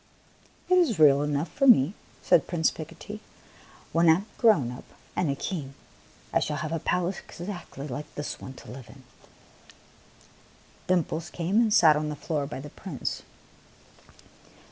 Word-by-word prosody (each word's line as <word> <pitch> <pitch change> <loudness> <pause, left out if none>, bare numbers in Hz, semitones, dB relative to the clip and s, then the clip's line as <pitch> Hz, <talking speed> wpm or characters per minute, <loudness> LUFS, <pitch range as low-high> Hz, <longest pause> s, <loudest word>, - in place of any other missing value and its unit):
'' - - -32
It 365 0 +5
is 295 - +2
real 145 -3 +6
enough 150 +2 -1
for 275 - +1
me," 185 - +6 0.3
said 160 - +4
Prince 165 -3 +1
Pico 160 +1 -9
tee. 210 +4 -8 0.7
"When 165 0 +4
I - - +9
am 185 +5 -2
grown 155 - +4
up 125 - -9 0.3
and 180 -4 +1
a 140 - 0
king, 140 -3 -5 0.6
I - - +4
shall 150 - -2
have 155 0 -4
a 165 - -1
palace 180 +3 -1
exactly 175 -6 -8
like 145 +3 -7
this 145 - -4
to - - -10 0.2
live 125 -1 -10
in." 135 -1 -15 1.8
Dimples 170 -2 0
came 180 +4 -1
and 230 -2 +4
sat 160 -6 +6
on 150 0 -1
the 150 - -4
floor 145 -1 -2
by 140 - -6
the 145 +2 -9
Prince. 170 -10 -5
160 Hz, 165 wpm, -27 LUFS, 145-180 Hz, 1.8 s, I